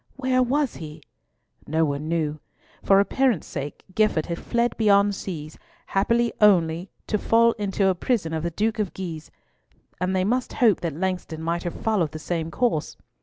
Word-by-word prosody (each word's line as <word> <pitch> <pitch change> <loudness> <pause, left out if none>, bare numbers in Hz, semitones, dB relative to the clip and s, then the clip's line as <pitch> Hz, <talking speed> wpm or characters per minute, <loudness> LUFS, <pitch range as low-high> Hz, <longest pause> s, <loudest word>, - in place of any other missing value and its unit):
Where 260 -1 +1
was 270 +2 0
he? 155 -1 -9 0.6
No 160 +2 +2
one 145 +1 -3
knew. 155 -2 -1 0.4
For 195 0 +5
appearance 235 - +1
sake, 140 +1 -6
Gifford 215 -6 +2
had 170 0 -4
fled 235 0 0
beyond 205 -2 +4
seas, 160 -6 -6 0.3
happily 235 +4 +1
only 175 -3 +4 0.2
to 210 - -1
fall 230 +2 +4
into 195 -1 +1
a 190 - +4
prison 180 -3 -1
of 160 - -1
the 170 - -1
Duke 215 +6 -1
of 205 -4 -2
Guise: 165 -5 -6 0.7
and 185 +1 0
they 185 - +2
must 245 +5 0
hope 225 -6 +3
that 165 -4 -3
Langston 180 -3 -3
might 170 +1 -1
have 175 - -4
followed 195 -9 0
the - - -4
same 165 0 -3
course. 225 -6 -1
190 Hz, 170 wpm, -24 LUFS, 160-220 Hz, 0.7 s, For